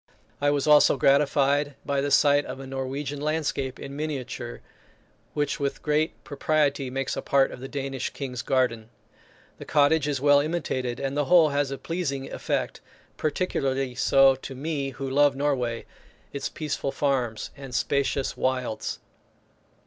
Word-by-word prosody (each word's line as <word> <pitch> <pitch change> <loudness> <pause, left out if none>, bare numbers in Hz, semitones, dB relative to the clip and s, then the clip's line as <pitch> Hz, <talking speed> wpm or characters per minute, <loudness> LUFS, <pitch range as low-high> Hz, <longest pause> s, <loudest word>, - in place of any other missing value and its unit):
I 145 - +3
was 145 -1 +1
also 150 -2 +6
gratified 140 +1 +3
by 140 -1 0
the 145 - -1
sight 145 +1 +4
of 130 +1 -7
a 135 - -7
Norwegian 135 +2 -4
landscape 150 -3 -2
in 140 0 -7
miniature, 135 -5 -5 0.7
which 145 -1 -1
with 140 -1 -2
great 150 +1 0
propriety 145 -2 0
makes 135 +1 -2
a - - -3
part 135 -1 +2
of - - -9
the 135 - -7
Danish 135 -2 -3
King's 125 -3 -5
garden. 120 -5 0 0.7
The - - -8
cottage 150 0 +3
is 145 -2 -1
well 145 +1 +5
imitated, 135 -6 -2
and 135 0 -2
the 145 0 +1
whole 170 -1 +6
has 145 -1 0
a 135 - -4
pleasing 140 -6 -3
effect, - - -2 0.3
particularly 135 -5 -1
so 135 +1 +5
to 135 0 -8
me 140 0 -2
who 135 +1 -6
love 140 +1 +3
Norway 130 -5 -1 0.5
its 140 -1 -3
peaceful 150 -3 -3
farms 130 -7 -1
and 135 -3 -8
spacious 140 0 0
wilds. 130 -4 -2
140 Hz, 150 wpm, -26 LUFS, 135-145 Hz, 0.7 s, also